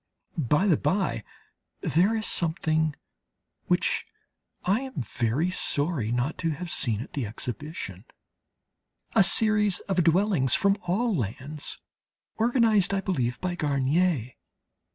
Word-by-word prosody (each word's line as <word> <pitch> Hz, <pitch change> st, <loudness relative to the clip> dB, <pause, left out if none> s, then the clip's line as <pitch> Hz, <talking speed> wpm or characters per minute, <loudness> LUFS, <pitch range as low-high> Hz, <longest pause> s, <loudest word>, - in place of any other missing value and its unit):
By 150 Hz, -, +2 dB
the 175 Hz, -7 st, +4 dB
bye, 185 Hz, +7 st, 0 dB, 0.6 s
there 180 Hz, -, +2 dB
is 220 Hz, -1 st, -1 dB
something 160 Hz, -2 st, 0 dB, 0.7 s
which -, -, +1 dB, 0.6 s
I 195 Hz, +5 st, +2 dB
am 265 Hz, -, -6 dB
very 120 Hz, -, -1 dB
sorry 145 Hz, -9 st, 0 dB
not 125 Hz, +6 st, -1 dB
to 165 Hz, -, 0 dB
have 165 Hz, +3 st, -4 dB
seen 110 Hz, -4 st, 0 dB
at 125 Hz, -, -9 dB
the 135 Hz, -6 st, -2 dB
exhibition 115 Hz, -, -6 dB, 1.1 s
a -, -, +6 dB
series 210 Hz, 0 st, +4 dB
of 185 Hz, -3 st, 0 dB
dwellings 170 Hz, -5 st, +3 dB
from 200 Hz, 0 st, +2 dB
all 220 Hz, +6 st, +1 dB
lands, 135 Hz, -, -4 dB, 0.6 s
organized 225 Hz, -4 st, +3 dB
I 195 Hz, -, 0 dB
believe 125 Hz, -11 st, -1 dB
by 180 Hz, -1 st, -1 dB
Garnier. 145 Hz, -2 st, +1 dB
165 Hz, 120 wpm, -26 LUFS, 135-195 Hz, 1.1 s, a